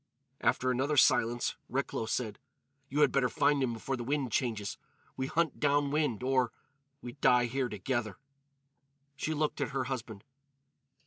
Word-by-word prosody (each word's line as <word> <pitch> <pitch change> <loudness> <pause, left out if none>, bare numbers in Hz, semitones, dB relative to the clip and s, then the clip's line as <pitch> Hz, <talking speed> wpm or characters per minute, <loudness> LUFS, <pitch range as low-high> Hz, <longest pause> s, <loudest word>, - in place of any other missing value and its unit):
After 130 0 +2
another 135 +4 0
silence, 120 -2 +3
Recklow 110 - -2
said: 110 -2 -2 0.5
"You 145 +3 +1
had 145 -3 +5
better 135 -3 +2
find 145 +3 +2
him 130 -2 +1
before 115 +4 -3
the 120 - -5
wind 135 -1 -1
changes. 110 -4 -1 0.4
We 130 0 -2
hunt 165 +3 0
down 145 -1 +2
wind 145 -7 0
or—we 135 +1 -3
die 125 -1 +5
here 130 +1 -1
together." 110 0 -2 1.0
She 155 +4 -2
looked 150 0 -1
at 135 - 0
her 135 - +1
husband. 115 -6 -5
130 Hz, 145 wpm, -31 LUFS, 120-140 Hz, 1.0 s, had